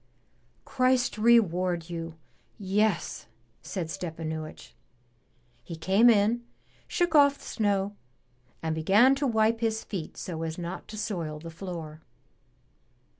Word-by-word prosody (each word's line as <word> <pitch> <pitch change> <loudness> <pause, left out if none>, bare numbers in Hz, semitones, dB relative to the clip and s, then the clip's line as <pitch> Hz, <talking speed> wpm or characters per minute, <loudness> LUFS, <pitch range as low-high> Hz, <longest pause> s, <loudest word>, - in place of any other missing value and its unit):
"Christ 255 -3 +1
reward 185 -7 +3
you! 165 -1 -5 0.4
Yes!" 200 -1 0 0.3
said 185 -4 -4
Stepanuich. 160 -2 -6 0.9
He 170 - -7
came 195 +8 +4
in, 225 +2 +3 0.4
shook 350 -5 0
off 285 -2 +6
the - - -17
snow, 205 -2 0 0.7
and 160 -1 0
began 200 +11 +5
to 275 +1 0
wipe 225 -1 +2
his 225 -1 -1
feet 180 -7 -6
so 165 -3 -5
as 160 0 -4
not 175 +1 -6
to 215 - -8
soil 175 -8 -3
the 165 +2 -9
floor. 165 -3 -7
195 Hz, 120 wpm, -28 LUFS, 165-225 Hz, 0.9 s, off